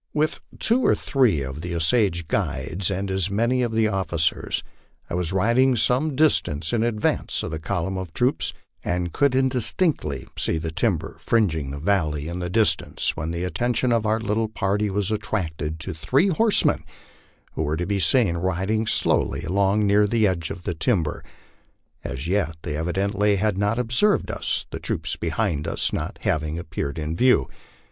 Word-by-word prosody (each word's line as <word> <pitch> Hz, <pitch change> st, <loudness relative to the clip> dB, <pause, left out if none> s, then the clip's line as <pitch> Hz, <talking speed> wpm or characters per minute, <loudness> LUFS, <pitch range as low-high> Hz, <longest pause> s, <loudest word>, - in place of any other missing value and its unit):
With 155 Hz, +1 st, +1 dB, 0.2 s
two 235 Hz, +3 st, +3 dB
or -, -, +4 dB
three 120 Hz, -, +2 dB
of 65 Hz, +3 st, -6 dB
the 85 Hz, 0 st, -4 dB
Osage 85 Hz, 0 st, +1 dB
guides 85 Hz, +9 st, -1 dB
and 95 Hz, 0 st, -2 dB
as 95 Hz, 0 st, 0 dB
many 115 Hz, +5 st, +1 dB
of 120 Hz, -2 st, 0 dB
the 110 Hz, -1 st, +2 dB
officers, 85 Hz, -6 st, 0 dB, 0.5 s
I -, -, -3 dB
was 90 Hz, -2 st, 0 dB
riding 120 Hz, +7 st, +3 dB
some 130 Hz, +6 st, +1 dB
distance 85 Hz, -, +1 dB
in 115 Hz, -, +2 dB
advance 110 Hz, -2 st, 0 dB
of -, -, -4 dB
the 80 Hz, -, -4 dB
column 95 Hz, +2 st, -2 dB
of 95 Hz, -3 st, -6 dB
troops, 125 Hz, -, 0 dB, 0.3 s
and 90 Hz, -1 st, -2 dB
could 140 Hz, -2 st, +2 dB
indis 130 Hz, -3 st, +2 dB
tinctly 175 Hz, -5 st, 0 dB
see 80 Hz, -, 0 dB
the 80 Hz, 0 st, -3 dB
timber -, -, -1 dB
fringing 80 Hz, -11 st, +1 dB
the 70 Hz, -, -5 dB
valley 75 Hz, -3 st, 0 dB
in 85 Hz, +2 st, -4 dB
the 90 Hz, 0 st, -3 dB
distance, 110 Hz, +3 st, 0 dB
when 80 Hz, +1 st, -3 dB
the 85 Hz, +1 st, -3 dB
attention 120 Hz, +7 st, 0 dB
of 115 Hz, -2 st, +1 dB
our 110 Hz, +1 st, +2 dB
little 110 Hz, 0 st, 0 dB
party 105 Hz, 0 st, -1 dB
was 100 Hz, +1 st, -1 dB
attracted 85 Hz, -8 st, -3 dB
to 95 Hz, +3 st, -4 dB
three 135 Hz, -, +2 dB
horsemen 215 Hz, +5 st, +2 dB, 0.7 s
who -, -, -4 dB
were 80 Hz, 0 st, -1 dB
to 90 Hz, -, -2 dB
be 100 Hz, +1 st, -1 dB
seen 100 Hz, -4 st, +2 dB
riding 95 Hz, +5 st, -1 dB
slowly -, -, +1 dB
along 100 Hz, +4 st, +2 dB
near 105 Hz, +1 st, +4 dB
the 110 Hz, 0 st, +2 dB
edge 85 Hz, -4 st, 0 dB
of 95 Hz, -3 st, -7 dB
the 85 Hz, -, -2 dB
timber. 85 Hz, -, 0 dB, 0.8 s
As 70 Hz, +1 st, -5 dB
yet 90 Hz, -4 st, 0 dB
they 75 Hz, -4 st, -3 dB
evidently 100 Hz, +5 st, +1 dB
had 105 Hz, 0 st, +1 dB
not 105 Hz, +3 st, 0 dB
ob 120 Hz, -2 st, -2 dB
served 205 Hz, +11 st, +2 dB
us, -, -, -1 dB
the -, -, -5 dB
troops -, -, -2 dB
behind 85 Hz, -2 st, -1 dB
us -, -, -1 dB
not -, -, -3 dB
having 75 Hz, +1 st, 0 dB
appeared 80 Hz, -3 st, -4 dB
in 80 Hz, +1 st, -3 dB
view. 125 Hz, -, +4 dB
95 Hz, 180 wpm, -24 LUFS, 85-115 Hz, 0.8 s, or